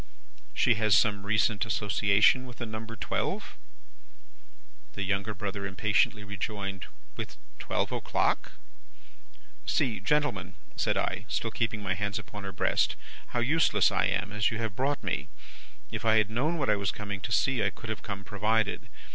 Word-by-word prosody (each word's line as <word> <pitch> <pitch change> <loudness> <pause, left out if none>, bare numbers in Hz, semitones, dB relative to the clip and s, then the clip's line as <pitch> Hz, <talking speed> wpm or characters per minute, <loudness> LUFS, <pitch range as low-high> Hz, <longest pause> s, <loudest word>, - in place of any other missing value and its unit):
"'She 120 - +4
has 110 0 +4
some 100 -3 +2
recent 105 -1 +2
association 105 +4 +3
with 125 - -11
the 120 - -4
number 110 +1 -6
twelve?' 105 - -2 1.4
"The 100 - -3
younger 100 +2 -1
brother 100 0 -3
impatiently 105 +2 +2
rejoined, 100 -1 -4 0.3
'With - - -6 0.2
twelve - - -1
o'clock?' - - 0 1.1
"'See, 120 -7 +1
gentlemen,' 100 -12 0 0.2
said - - +1
I, - - -1
still 115 +1 -1
keeping 110 -3 -1
my 95 -1 +1
hands 100 0 -2
upon 105 -1 -7
her 95 - -4
breast, 90 - +1 0.3
'how 120 - -1
useless 120 -6 +4
I 95 - +2
am, 95 0 -1
as 105 0 +2
you 110 - -3
have 110 -3 -3
brought 140 +4 0
me! - - -2 0.6
If - - -4
I 110 -1 +5
had 105 0 +3
known 150 +9 +1
what 135 -4 0
I 105 - +3
was 100 -1 0
coming 100 -2 -4
to 120 - -5
see, 130 0 +2
I 100 - +3
could 110 - -10
have 105 -4 -5
come 100 -2 -5
provided. 105 +2 0
105 Hz, 165 wpm, -29 LUFS, 100-115 Hz, 1.4 s, I